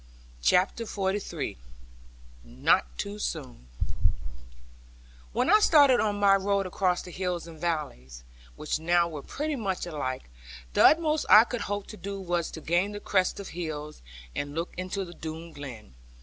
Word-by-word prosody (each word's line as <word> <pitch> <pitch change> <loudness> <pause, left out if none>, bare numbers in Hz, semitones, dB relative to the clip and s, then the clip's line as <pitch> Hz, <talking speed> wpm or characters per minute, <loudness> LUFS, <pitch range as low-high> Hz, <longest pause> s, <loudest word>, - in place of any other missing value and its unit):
CHAPTER 185 - +2
XLIII 195 - -3 0.9
NOT - - +1
TOO 100 +7 -4
SOON - - -5 1.6
When - - +1
I 425 +3 +7
started 285 - +6
on 210 -1 +1
my 200 -1 +6
road 200 0 0
across 180 -1 0
the 180 - -9
hills 180 -2 -3
and 160 -2 -12
valleys 130 - -3 0.3
(which 155 0 -2
now 170 +1 +3
were 155 -4 -6
pretty 300 - -3
much 195 -8 -2
alike), 130 - -4 0.4
the - - +4
utmost 310 -1 +4
I 215 - +10
could 240 0 -4
hope 205 0 -3
to 215 - -10
do 200 0 -5
was 175 -3 -1
to 160 - -8
gain 175 +6 +1
the 205 - -5
crest 190 -2 +1
of 200 - -7
hills, 155 -3 -6 0.3
and 145 0 -4
look 165 +2 -3
into 185 +2 -3
the 175 - -10
Doone 160 0 -7
Glen. 125 - -9
175 Hz, 155 wpm, -28 LUFS, 150-200 Hz, 1.6 s, I